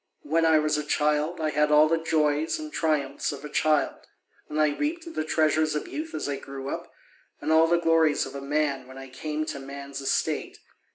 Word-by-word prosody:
When 165 +2 +2
I 160 -1 +5
was 150 0 +1
a - - -3
child, 150 +3 0
I 155 -1 0
had 150 +1 +2
all 150 +1 +7
the 165 +1 +1
joys 155 -1 +1
and 310 -1 -7
triumphs 145 -4 0
of 145 0 -8
a - - -6
child, 155 0 +1 0.5
and 150 - -2
I 155 0 +4
reaped 330 +2 -3
the - - -1
treasures 155 0 +2
of 150 - -3
youth 320 +2 -5
as - - -3
I 140 -1 -2
grew 135 0 -7
up, - - -5 0.5
and 155 - -2
all 160 +1 +6
the 170 +1 +3
glories 165 -2 +3
of 135 - -9
a 140 - -6
man 140 -2 -1
when 130 0 -12
I 135 0 -9
came 155 +4 -3
to 155 -3 -5
man'e 140 +1 -8
estate. 135 - -1
150 Hz, 215 wpm, -26 LUFS, 140-160 Hz, 0.5 s, all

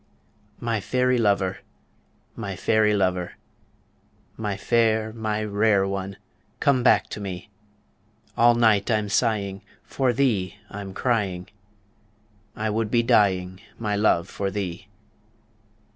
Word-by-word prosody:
My 115 -2 -1
fairy 125 +2 +1
lover, 100 -3 +1 0.8
my - - -5
fairy 110 -1 +2
lover, 90 -3 0 1.0
My 105 -3 -3
fair, 110 0 +1
my 110 -1 -2
rare 100 -1 +2
one, 95 0 -4 0.4
come 140 -3 +3
back 120 - +4
to - - -6
me 95 0 -7 0.8
All 120 0 +5
night 110 -3 +3
I'm 105 -2 +1
sighing, 100 -3 0 0.2
for 130 -2 0
thee 110 -7 0
I'm 95 -1 -7
crying, 100 -8 -1 1.1
I 110 - -2
would 110 0 -1
be 120 +1 +2
dying, 95 -6 +2 0.2
my 105 -2 -2
love, 100 -5 +2
for 100 - -3
thee. 95 -1 -5
105 Hz, 115 wpm, -24 LUFS, 95-115 Hz, 1.1 s, All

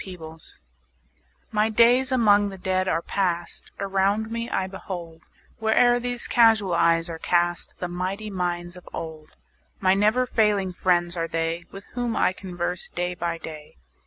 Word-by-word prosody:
His 185 -2 -8
Books 160 -1 -9 0.9
MY 215 0 +2
days 240 +4 +4
among 205 -5 +4
the 195 - -8
Dead 185 0 0
are 165 -2 0
past; 175 -3 -2
Around 200 +3 0
me 230 0 -3
I 190 - 0
behold, 175 -4 -7 0.4
Where'er 240 +2 +4
these 245 0 -1
casual 225 -6 +4
eyes 165 0 +3
are 165 -1 -6
cast, 175 0 +1
The 180 - -3
mighty 185 +4 -4
minds 175 -2 -3
of 180 - -13
old: 155 -2 -7 0.4
My 190 -1 +4
never 215 +6 +3
failing 205 -6 +1
friends 175 -1 +1
are 165 -1 -1
they, 165 +1 -2
5 - - -33
With 195 0 -9
whom 240 -2 -2
I - - +2
converse 180 -2 -4
day 180 0 -2
by 170 -1 -3
day. 155 - -10
185 Hz, 160 wpm, -25 LUFS, 175-215 Hz, 0.9 s, days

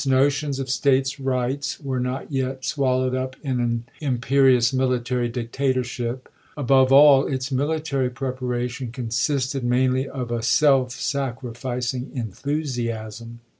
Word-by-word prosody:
tions 140 -1 -3
of 135 - -3
States 135 +1 +1
rights 130 +1 -2
were 135 -3 -3
not 125 +4 -3
yet 130 -1 -2
swallowed 130 -3 +1
up 130 0 -2
in 130 -3 -1
an 120 -1 0 0.2
imperious 130 -2 +3
military 125 -2 0
dictatorship; 125 0 -2 0.3
above 135 -2 +4
all, 140 0 +7
its 130 0 -3
military 140 -1 0
preparation 125 -1 -3
consisted 130 +2 -1
mainly 130 +2 +1
of 125 -3 -5
a 120 -1 -1
self 130 +1 +3
sacrificing 125 -1 -3
enthusiasm. 115 -2 -4
130 Hz, 115 wpm, -23 LUFS, 120-135 Hz, 0.3 s, all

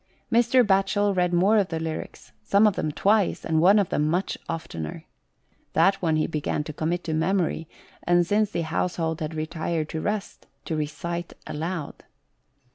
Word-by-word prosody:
Mr. 240 +1 +4
Batchel 195 0 +2
read 180 -1 +2
more 195 +5 +4
of 195 - +1
the 165 -2 -3
lyrics, 160 -1 -6
some 200 +2 +4
of 210 -3 +3
them 155 - -1
twice, 200 +5 +1
and 160 -1 +2
one 195 +5 +6
of 200 -3 +2
them 150 - +1
much 175 +5 0
oftener. 80 - -5 0.7
That 195 0 +3
one 165 -3 +2
he 155 - +2
began 150 -1 -2
to 155 - -7
commit 170 +4 -2
to 160 - -3
memory, 165 -1 0 0.3
and 175 0 +3
since 210 +3 +2
the 170 - -2
household 165 0 -1
had 155 0 -4
retired 160 0 -2
to 160 - -4
rest, 210 +1 -4 0.2
to 160 - -2
recite 165 +3 -4
aloud. 160 0 -5
170 Hz, 170 wpm, -25 LUFS, 160-195 Hz, 0.7 s, one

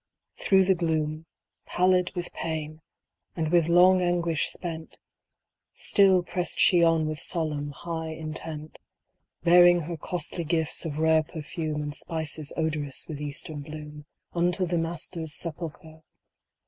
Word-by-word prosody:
Through 190 -1 +4
the 190 - +4
gloom, 160 -2 -2 0.4
Pallid 180 0 +2
with 175 -1 -4
pain, 155 -1 -4 0.5
and 160 -2 -2
with 170 -2 +4
long 180 +2 +6
anguish 170 -3 +1
spent, 165 -2 -6 0.8
Still 190 -3 +4
pressed 180 0 -3
she 175 -2 +6
on 165 -2 +3
with 155 -1 -3
solemn, 150 -3 -2
high 160 +3 -5
intent, 155 -1 -7 0.6
Bearing 175 0 +6
her 165 +1 -5
costly 170 +2 -3
gifts 160 +1 0
of 150 -2 -4
rare 160 0 +4
perfume 155 -1 -5
And 145 0 -4
spices 155 -1 -3
odorous 155 -4 -2
with 150 -2 -6
eastern 145 +1 -4
bloom. 150 0 -9 0.3
Unto 180 +2 +1
the 175 -1 0
Master's 165 -1 -1
sepulchre 160 -1 -4
160 Hz, 130 wpm, -26 LUFS, 155-175 Hz, 0.8 s, long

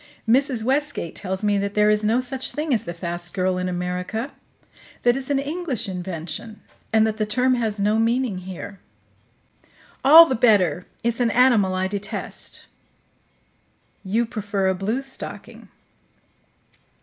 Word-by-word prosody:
Mrs. 255 -1 +2
Westgate 270 - -1
tells 190 +1 -4
me 205 -1 +2
that 200 0 -3
there 210 0 +4
is 210 0 +1
no 225 +4 +2
such 255 +1 -4
thing 300 -1 -1
as 225 - 0
the 170 - -5
'fast 175 +1 -4
girl' 185 -1 0
in 185 0 -2
America; 180 +7 -3 0.7
that 240 0 +4
it's 270 0 -4
an 285 - +2
English 280 - -3
invention, 180 +3 -6 0.3
and 220 0 +4
that 220 -1 -1
the 215 - 0
term 250 +4 +2
has 220 -4 -1
no 210 +2 +2
meaning 230 -3 +1
here." 190 +2 -8 1.2
"All 315 +5 +10
the 265 - -1
better. 200 - +3 0.2
It's 235 0 0
an 240 -2 +2
animal 225 -6 +4
I 185 0 0
detest." 205 +1 -5 1.4
"You 220 +5 0
prefer 205 -3 -2
a - - +2
bluestocking." 230 +9 -5
215 Hz, 145 wpm, -23 LUFS, 190-250 Hz, 1.4 s, All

